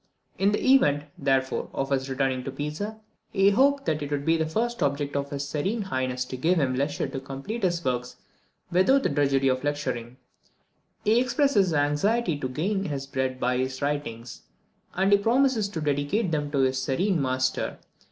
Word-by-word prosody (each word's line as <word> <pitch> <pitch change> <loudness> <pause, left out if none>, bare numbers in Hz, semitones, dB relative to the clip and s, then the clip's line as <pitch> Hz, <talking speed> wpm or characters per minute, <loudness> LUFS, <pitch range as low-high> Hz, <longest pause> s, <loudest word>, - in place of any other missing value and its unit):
In 195 +1 +3
the 210 - 0
event, 145 - +4
therefore, 135 -1 0
of 135 +1 -2
his 135 0 0
returning 130 -1 0
to 135 - -3
Pisa, 150 +11 -5 0.3
he 195 0 +4
hoped 275 +5 +3
that 155 -1 0
it 145 - -4
would 145 -1 -2
be 165 - +4
the 160 -1 0
first 235 +6 -2
object 140 0 -1
of 140 0 -1
his 140 -1 -4
serene 195 +10 -1
highness 130 -8 -2
to 130 - -6
give 170 +8 +2
him 135 -4 +1
leisure 140 +3 -1
to 135 - -5
complete 135 - -6
his 175 -3 0
works 125 -1 -2 0.6
without 260 +11 +4
the - - +2
drudgery 135 -2 +2
of 130 0 +1
lecturing. 130 -5 -3 0.9
He 220 +3 +4
expresses 255 -5 +2
his 170 - -1
anxiety 155 +7 +1
to 130 - -3
gain 195 +9 -1
his 140 -4 -3
bread 130 -1 -2
by 125 0 +1
his 130 0 -2
writings, 140 -5 -3 0.5
and 190 +2 +2
he 200 - +6
promises 235 -1 +2
to 175 - -5
dedicate 150 +7 0
them 145 -2 -1
to 145 - -2
his 130 0 +1
serene 165 +7 0
master. 130 -1 -1
145 Hz, 185 wpm, -26 LUFS, 135-195 Hz, 0.9 s, he